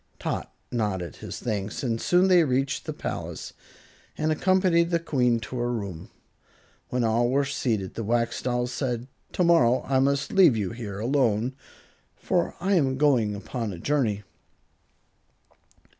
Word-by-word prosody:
Tot - - -4 0.2
nodded 95 - -2
his - - -7
thanks, 105 -1 -3
and 115 -3 -1
soon 180 +2 +4
they 180 -2 +6
reached 135 -1 0
the - - -3
palace - - -5 0.6
and 155 +1 0
accompanied 175 0 +3
the 170 - +2
Queen 125 -8 +1
to 125 - -6
her 120 0 0
room. 100 -8 -5 0.8
When 125 -1 0
all 115 +2 +2
were 140 +2 +2
seated 115 -8 -2
the 115 - -4
Wax 115 +2 0
Doll 125 -1 0
said, 125 -1 -3 0.3
"Tomorrow 165 -9 +3
I 135 0 +1
must 140 +1 +1
leave 175 -12 +6
you 100 -4 -2
here 110 -4 -6
alone, 120 -1 +1 0.6
for - - -1
I 190 +3 +1
am 135 -7 +2
going 125 -8 +2
upon 115 +2 -4
a 90 - -7
journey." 110 -3 0
125 Hz, 145 wpm, -26 LUFS, 110-145 Hz, 0.8 s, they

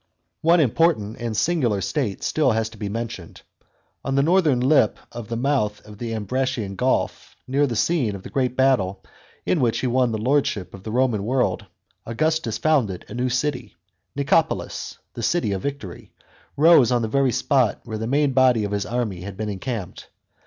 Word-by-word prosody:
One 170 +2 +4
important 135 -6 +2
and 115 -3 -3
singular 120 - +1
state 105 - -2
has - - -4
still 150 -4 +2
to 110 0 -2
be 105 -2 -3
mentioned. 110 -6 -6 0.6
On 135 0 -2
the 140 - +3
northern 160 -5 +3
lip 130 -3 +3
of 120 -2 -7
the 115 - -4
mouth 120 -5 0
of 105 -1 -13
the 115 -2 -3
Ambracian 110 -1 -2
gulf, 130 +5 -1
near 140 +3 +2
the 120 - -3
scene 125 -5 +1
of 95 - -9
the - - -10
great 130 -3 -1
battle 125 -8 +2 0.4
in 175 - +1
which 120 -4 +1
he - - -2
won 125 -1 +2
the 110 - -1
lordship 115 -5 0
of 95 - -10
the 110 - -7
Roman 120 -4 +1
world, 125 -3 0 0.4
Augustus 155 0 -1
founded 125 - +1
a - - -8
new 125 +1 -1
city. 125 -5 -2 0.4
Nicopolis, 150 +3 0 0.2
"the 120 - -6
city 115 -3 0
of 95 -1 -2
victory," 140 -11 -6 0.5
rose 150 -5 +6
on 120 -1 +2
the - - 0
very 135 +3 +2
spot 130 -2 +1
where 110 -2 -6
the 110 - -3
main 140 +2 +2
body 130 -4 +4
of 100 - -3
his 100 -1 -2
army 115 -7 -2
had 95 0 -8
been 110 -1 -3
encamped. 105 -1 -5
120 Hz, 185 wpm, -23 LUFS, 105-140 Hz, 0.6 s, rose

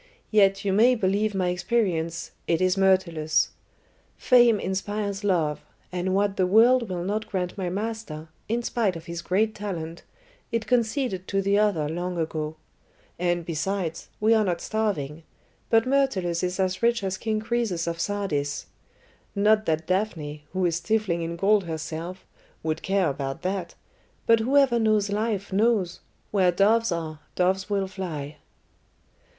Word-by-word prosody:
"Yet 200 -1 +4
you 195 - +1
may 240 +5 +5
believe 205 0 0
my 185 -2 +1
experience, 180 -4 -1 0.2
it 165 - +2
is 185 0 +2
Myrtilus. 170 -6 +2 0.7
Fame 240 -4 +5
inspires 200 +2 -3
love, 165 -7 +1 0.3
and 180 +1 -1
what 200 0 +1
the 185 - +2
world 230 +3 +5
will 175 -2 -3
not 210 +4 -2
grant 180 -3 -2
my 185 -3 -2
master, 195 -6 -5 0.2
in 235 +2 0
spite 225 -7 0
of 165 - -8
his 170 0 -5
great 210 +5 +1
talent, 170 -6 -5 0.5
it 230 -1 -1
conceded 235 -5 0
to 195 - 0
the 200 +1 +3
other 195 -8 +2
long 175 +3 -3
ago. 155 -1 -2 0.6
And, 175 -1 0
besides, 165 +1 -3
we 220 +2 +4
are 220 -1 +4
not 175 -4 -1
starving; 165 -9 -2 0.5
but 225 -1 +4
Myrtilus 255 -11 +1
is 180 +1 -2
as 185 0 0
rich 235 -2 +2
as 190 -1 -1
King 215 +2 -1
Croesus 220 -6 -1
of 170 0 -3
Sardis. 155 -8 -2 0.7
Not 215 +2 +3
that 160 0 0
Daphne, 160 -6 -2
who 185 +1 0
is 170 -1 +1
stifling 185 -2 0
in 165 0 -3
gold 200 +2 +3
herself, 165 +3 -5 0.4
would 160 0 -2
care 195 -3 +1
about 135 +4 -5
that, 185 -2 -3 0.5
but 230 0 +5
whoever 260 0 +3
knows 215 -2 +2
life 205 -2 -2
knows 205 -4 +2 0.3
where 185 -3 +3
doves 215 +4 +3
are, 160 -2 -3 0.2
doves 190 +2 +1
will 200 -1 +1
fly." 160 -6 -6
190 Hz, 150 wpm, -25 LUFS, 170-215 Hz, 0.7 s, may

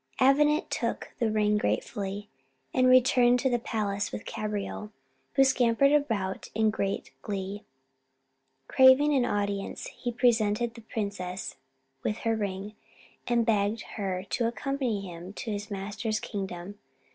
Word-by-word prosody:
Avenant 295 +5 +4
took - - -2
the 230 - +2
ring 210 -1 +2
gratefully 205 -1 -2 0.5
and 255 0 +4
returned 250 -1 +5
to 265 - +1
the 240 - +2
palace 205 -3 -2
with - - -6
Cabriole, 210 0 -4 0.4
who 270 - +6
scampered 260 0 +4
about 225 -11 0
in 220 0 +3
great 195 -2 -2
glee. 200 0 -4 1.1
Craving 265 +3 +6
an 260 -3 +3
audience, 200 -3 -2
he 245 - -4
presented 230 -1 +2
the 230 - -11
princess 200 -4 -4 0.5
with 215 - -1
her 225 0 +2
ring, 200 -1 -3 0.5
and 235 -1 +2
begged 215 0 +1
her 190 -3 -2
to 235 - +1
accompany 240 -2 -2
him 180 0 -8
to 225 +1 -5
his 205 0 -4
master's 210 +2 -3
kingdom. 195 0 -6
215 Hz, 135 wpm, -28 LUFS, 200-245 Hz, 1.1 s, who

